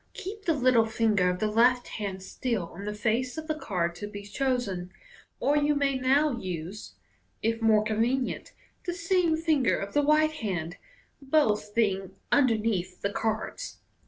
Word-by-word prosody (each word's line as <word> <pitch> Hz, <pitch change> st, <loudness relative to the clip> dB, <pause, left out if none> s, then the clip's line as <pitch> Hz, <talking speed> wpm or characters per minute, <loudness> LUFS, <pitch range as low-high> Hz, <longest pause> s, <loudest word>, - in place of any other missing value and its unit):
Keep 400 Hz, +2 st, -7 dB
the 330 Hz, -, +2 dB
little 255 Hz, -4 st, +4 dB
ringer 215 Hz, -5 st, +2 dB
of 180 Hz, -, -1 dB
the 215 Hz, -, -1 dB
»2 -, -, +1 dB
MODERN 210 Hz, -, -7 dB
MAGIC, 255 Hz, +1 st, +6 dB
left 245 Hz, -, -16 dB
hand 195 Hz, -3 st, -5 dB
still 210 Hz, -4 st, -3 dB
on 200 Hz, +3 st, -8 dB
the 210 Hz, 0 st, -3 dB
face 240 Hz, +5 st, 0 dB
of 315 Hz, -, -4 dB
the 310 Hz, -, -1 dB
card 180 Hz, -, -2 dB
to 205 Hz, -, -5 dB
be 205 Hz, -1 st, -8 dB
chosen, 205 Hz, -6 st, -2 dB, 0.5 s
or 290 Hz, -, +2 dB
you 295 Hz, 0 st, +3 dB
ma} 280 Hz, -1 st, +2 dB
now 270 Hz, +4 st, +3 dB
Lse, 185 Hz, -2 st, -6 dB, 0.5 s
if 230 Hz, +1 st, 0 dB
more 220 Hz, -1 st, +4 dB
convenient, 230 Hz, +4 st, -1 dB, 0.3 s
the 350 Hz, -1 st, -2 dB
same 340 Hz, -2 st, +2 dB
finger 315 Hz, -5 st, +2 dB
of 200 Hz, 0 st, -5 dB
the 290 Hz, -, +3 dB
right 305 Hz, +1 st, +4 dB
hand, 180 Hz, -, -4 dB, 0.4 s
both 225 Hz, -8 st, +1 dB
being 195 Hz, -4 st, 0 dB, 0.2 s
underneath 220 Hz, -9 st, +1 dB
the 200 Hz, 0 st, -1 dB
cards. 220 Hz, -, -3 dB
225 Hz, 175 wpm, -28 LUFS, 200-285 Hz, 0.5 s, MAGIC